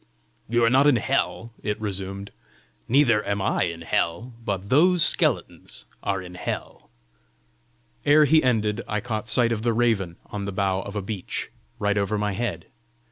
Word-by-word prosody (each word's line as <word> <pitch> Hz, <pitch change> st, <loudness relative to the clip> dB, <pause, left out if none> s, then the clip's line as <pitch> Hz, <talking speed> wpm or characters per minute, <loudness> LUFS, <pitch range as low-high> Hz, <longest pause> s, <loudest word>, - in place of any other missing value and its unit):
"You 120 Hz, 0 st, +2 dB
are 115 Hz, -, +5 dB
not 135 Hz, +3 st, +5 dB
in 145 Hz, -, +6 dB
hell," 115 Hz, -4 st, -1 dB
it 105 Hz, -1 st, -2 dB
resumed. 100 Hz, -1 st, -5 dB, 0.6 s
"Neither 120 Hz, -4 st, +4 dB
am 100 Hz, 0 st, -1 dB
I 95 Hz, -, +1 dB
in 85 Hz, -1 st, -5 dB
hell. 85 Hz, +8 st, -1 dB
But 100 Hz, -2 st, -3 dB
those 175 Hz, +4 st, +5 dB
skeletons -, -, 0 dB, 0.2 s
are 95 Hz, -2 st, -2 dB
in 90 Hz, 0 st, -10 dB
hell!" 90 Hz, -, -6 dB, 1.1 s
Ere 150 Hz, +1 st, +6 dB
he 155 Hz, +2 st, +5 dB
ended 110 Hz, -3 st, +1 dB
I 105 Hz, -, -1 dB
caught 110 Hz, 0 st, -4 dB
sight 120 Hz, -2 st, +3 dB
of 110 Hz, -2 st, -1 dB
the 115 Hz, 0 st, +1 dB
raven 110 Hz, -7 st, +1 dB
on 100 Hz, -1 st, -5 dB
the 100 Hz, -, -3 dB
bough 95 Hz, -1 st, 0 dB
of 100 Hz, +1 st, -8 dB
a 105 Hz, -, -2 dB
beech, 100 Hz, -2 st, -4 dB, 0.3 s
right 105 Hz, -2 st, +1 dB
over 100 Hz, +1 st, 0 dB
my 105 Hz, 0 st, 0 dB
head. 120 Hz, +4 st, -3 dB
105 Hz, 170 wpm, -24 LUFS, 100-120 Hz, 1.1 s, in